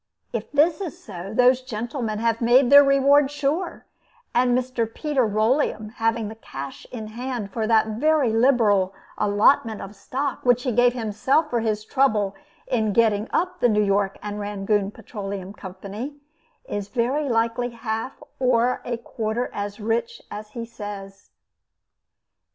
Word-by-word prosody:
If - - -4
this 310 +6 +3
is 355 -7 -5
so, 190 -1 -8
those 250 +3 +4
gentlemen 235 -1 -4
have 230 +1 0
made 245 +2 +5
their 285 0 +10
reward 275 +1 +4
sure; 295 +5 -2 0.5
and 245 0 +3
Mr. 250 -3 -2
Peter 275 -3 0
Rolleum, 215 +1 +1
having 225 -1 0
the 215 - -6
cash 140 -10 -8
in 225 -3 -6
hand 240 -2 -5
for 220 -2 -1
that 220 -1 +4
very 260 +3 +2
liberal 220 -6 +3 0.2
allotment 210 +2 +3
of 195 +2 -8
stock 270 +6 -3
which 245 0 +3
he 255 - 0
gave 245 +1 +4
himself 245 +7 0
for 240 - +1
his 215 -2 -1
trouble 215 -8 +2 0.3
in 220 -5 0
getting 215 -1 +3
up 360 +1 -1
the 245 - +4
New 210 -1 +3
York 200 -1 +1
and 210 0 -4
Rangoon 205 0 -1
Petroleum 200 -3 -7
Company, 200 +8 -7 0.5
is 205 -1 -4
very 255 +6 0
likely 230 +1 +1
half 230 +1 -5 0.2
or 250 -1 +2
a 240 -1 -3
quarter 230 +1 -3
as 205 +1 -4
rich 225 +2 -1
as 210 +1 -8
he 235 -2 -5
says. 200 -3 -9
230 Hz, 150 wpm, -24 LUFS, 210-255 Hz, 0.5 s, their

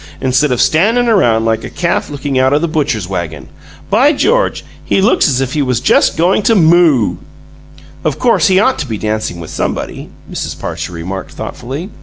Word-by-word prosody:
"Instead 130 +2 +1
of 125 - 0
standing 225 +10 +2
around 120 - +2
like 115 0 0
a - - -6
calf 170 -1 -2
looking 140 -2 -2
out 130 +1 +3
of 145 - +2
the - - +1
butcher's 140 - -1
wagon! 85 -6 -5 0.4
By 265 +9 +4
George! 475 - 0 0.2
he - - 0
looks 200 +5 +3
as 130 -1 0
if 135 -1 -2
he 150 - 0
was 125 -4 0
just - - +2
going 180 +5 +2
to 225 +2 +2
MOO!" 165 - +3 0.8
"Of 155 -3 -1
course 240 -2 +2
he 190 -1 +4
ought 260 +6 +2
to 150 - -3
be 110 - -3
dancing 105 -4 -3
with 80 - -8
somebody," - - -4 0.2
Mrs. - - -5
Parcher - - -5
remarked, 90 +3 -6
thoughtfully. 140 - -7
145 Hz, 190 wpm, -14 LUFS, 115-190 Hz, 0.8 s, By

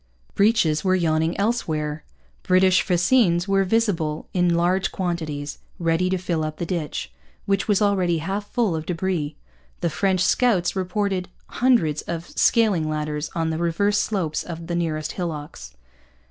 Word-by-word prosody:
Breaches 200 -8 +3
were 185 -1 +3
yawning 160 -1 +1
elsewhere. 155 -9 -1 0.4
British 185 0 +4
fascines 175 -1 +2
were 195 0 +3
visible 185 -7 0
in 175 -2 +2
large 180 +3 +1
quantities, 160 -6 -3 0.2
ready 170 +2 +1
to 190 - +1
fill 175 -3 -2
up 155 0 -4
the 170 - -3
ditch, 165 -4 -4 0.3
which 195 -1 0
was 210 -1 +3
already 185 -4 +2
half 195 +6 -4
full 225 -9 +1
of 155 0 -5
debris. 170 -4 -2 0.5
The 170 - 0
French 185 +3 +1
scouts 195 -4 +2
reported 190 0 -1 0.2
hundreds 230 - +2
of 170 0 -5
scaling 205 -10 +3
ladders 150 0 -3
on 165 -1 0
the 160 - -3
reverse 200 +5 +1
slopes 180 -8 -1
of 170 -1 -7
the 175 0 -3
nearest 155 -3 -2
hillocks. 150 - -6
175 Hz, 145 wpm, -23 LUFS, 160-195 Hz, 0.5 s, British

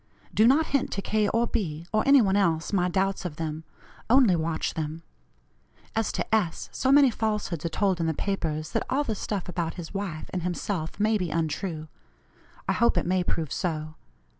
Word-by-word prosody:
Do 220 +2 +5
not 290 +5 +5
hint 275 - +2
to 195 - -2
K. 215 -1 +1
or 230 +1 +2
B., 165 -9 -3
or 215 - +4
any 275 -3 +7
one 195 -1 +2
else, 170 -3 +1
my 180 -2 +2
doubts 190 +2 0
of 175 -5 -4
them, 160 0 -4 0.5
only 245 -6 +6
watch 165 0 -1
them. 160 +1 -4 0.9
As 225 -1 +1
to - - -1
S. 200 -7 0
so 265 - +1
many 275 -2 +7
falsehoods 210 -8 -2
are - - -3
told 190 +1 +1
in 165 - 0
the 160 - 0
papers 155 -6 -2
that - - 0
all 280 +3 +1
the 230 - -2
stuff 205 -2 -3
about 170 -2 -3
his 175 0 -8
wife 195 -6 -4
and 185 - -1
himself 175 0 -3
may 215 +1 +2
be 180 -3 -2
untrue. 160 +1 -2 0.8
I - - +2
hope 235 - +3
it - - +1
may 180 +1 +1
prove 160 -4 -2
so. 155 -3 -2
185 Hz, 195 wpm, -27 LUFS, 160-215 Hz, 0.9 s, any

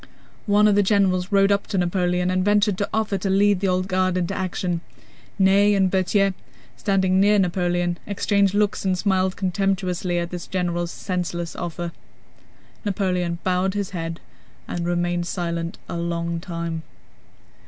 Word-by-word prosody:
One 210 +1 +5
of 210 - +4
the 205 - +4
generals 190 -2 +2
rode 195 0 +4
up 200 0 +1
to 195 - -2
Napoleon 180 0 +1
and 185 0 +1
ventured 205 0 +3
to 200 - -1
offer 215 -3 0
to 195 - -2
lead 200 0 +3
the 195 - 0
Old 185 0 0
Guard 185 -1 +1
into 180 +1 -1
action. 180 -2 -2 0.6
Ney 200 +1 +4
and 190 -2 +2
Berthier, 195 +1 +2 0.4
standing 190 -2 +1
near 205 +2 +5
Napoleon, 175 -2 0
exchanged 200 -1 +1
looks 205 -1 +1
and 190 -1 +1
smiled 190 -1 +1
contemptuously 185 -2 -1
at 170 0 -2
this 175 -1 -6
general's 175 -2 -1
senseless 175 -2 -4
offer. 175 -1 -4 0.9
Napoleon 180 -4 -1
bowed 185 +1 +1
his 200 -2 -2
head 165 -2 -4 0.5
and 170 0 -3
remained 175 0 0
silent 170 -2 -3
a - - -4
long 170 0 -2
time. 165 -1 -4
185 Hz, 155 wpm, -23 LUFS, 175-195 Hz, 0.9 s, One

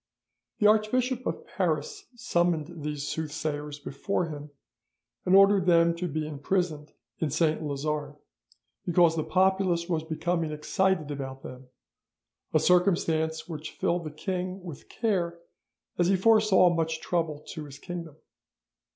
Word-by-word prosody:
The 210 - +1
Archbishop 240 +4 +2
of - - -4
Paris 160 -6 -2
summoned 175 -8 0
these 145 -1 -4
soothsayers 150 -1 -3
before 165 +5 -2
him, 150 -1 -7 0.8
and 185 - +5
ordered 195 -1 +6
them 170 -1 +5
to 180 +1 -2
be 155 -1 -3
imprisoned 155 0 -2 0.3
in 160 - 0
Saint 155 +2 +1
Lazare, 145 0 -3 0.7
because 170 -1 +4
the 160 - 0
populace 185 -2 +2
was 165 -3 -1
becoming 160 0 -1
excited 155 +1 0
about 135 -1 -6
them—a 130 +4 -7
circumstance 160 -2 +2
which 160 -2 -7
filled 175 0 0
the 155 - -5
king 185 +4 -4
with 165 -6 -9
care, 180 -7 -1 0.6
as 175 - +4
he 195 - +4
foresaw 200 -3 +5
much 160 -1 -1
trouble 165 -3 -1
to 155 - -6
his 140 -1 -11
kingdom. 170 -1 -7
165 Hz, 130 wpm, -28 LUFS, 150-180 Hz, 0.8 s, ordered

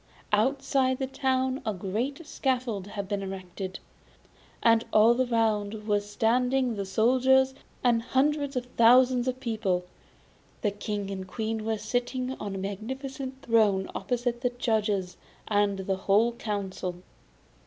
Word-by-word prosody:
Outside 260 +3 +2
the 265 - -1
town 260 0 0
a 215 - -2
great 235 - -3
scaffold 245 -9 -1
had 200 -1 -5
been 200 0 -2
erected, 190 -1 -6 0.9
and 230 -1 +5
all 235 +4 +5
round 215 -2 0
were 205 -1 +3
standing 245 +5 +1
the 200 -1 -4
soldiers, 260 +5 +3 0.3
and 240 -2 +3
hundreds 280 +3 +1
of 250 -1 -1
thousands 250 +2 +5
of 255 0 -1
people. 215 -7 -1 0.8
The 210 - +2
King 205 -1 -4
and 190 -1 -5
Queen 220 +2 -3
were 220 0 0
sitting 250 +3 -2
on 200 -2 -4
a - - -3
magnificent 265 +7 -5
throne 210 -4 +2
opposite 240 +4 -2
the 250 - +2
judges 215 -6 -1 0.3
and 205 -1 +2
the 190 0 -2
whole 205 +5 +3
council. 190 -5 -4
225 Hz, 130 wpm, -28 LUFS, 200-255 Hz, 0.9 s, and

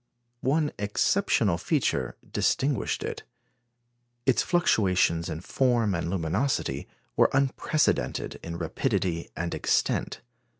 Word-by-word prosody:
One 150 +3 +1
exceptional 105 - +1
feature 90 - 0
distinguished 135 -4 0
it. - - -4 1.0
Its 130 - +4
fluctuations 95 - +2
in 80 0 -4
form 120 -1 +1
and 85 -1 -2
luminosity 95 - -1 0.3
were - - +5
unprecedented 140 +3 0
in 85 0 -6
rapidity 90 0 -1
and 85 0 -3
extent. - - 0
105 Hz, 95 wpm, -27 LUFS, 85-135 Hz, 1.0 s, were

